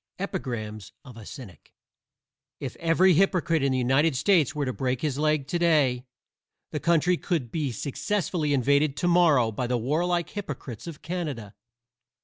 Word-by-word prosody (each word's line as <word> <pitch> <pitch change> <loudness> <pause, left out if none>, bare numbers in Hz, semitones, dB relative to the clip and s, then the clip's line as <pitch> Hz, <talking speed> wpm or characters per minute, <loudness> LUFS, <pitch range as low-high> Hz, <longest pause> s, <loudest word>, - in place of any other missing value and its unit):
EPIGRAMS 120 - -5
OF 125 -3 -12
A 110 -3 -11
CYNIC 115 -10 -12 0.8
If - - -5
every 170 +3 +4
hypocrite 170 -3 +2
in 135 0 +1
the 130 - +1
United 135 +4 +2
States 160 0 +2
were 145 -1 -1
to 130 - -2
break 130 -2 -2
his 145 -3 -2
leg 155 -2 +1
to 175 - -1
day 140 -7 +2 0.6
the 150 - -3
country 170 +3 +2
could 155 -12 -2
be 150 -5 -2
successfully 155 - -2
invaded 140 +2 +2
to 175 - 0
morrow 160 -10 +4
by 120 +3 -3
the 125 0 0
warlike 170 +8 0
hypocrites 145 - -7
of 165 -4 -9
Canada. 150 - -4
145 Hz, 155 wpm, -26 LUFS, 125-170 Hz, 0.8 s, every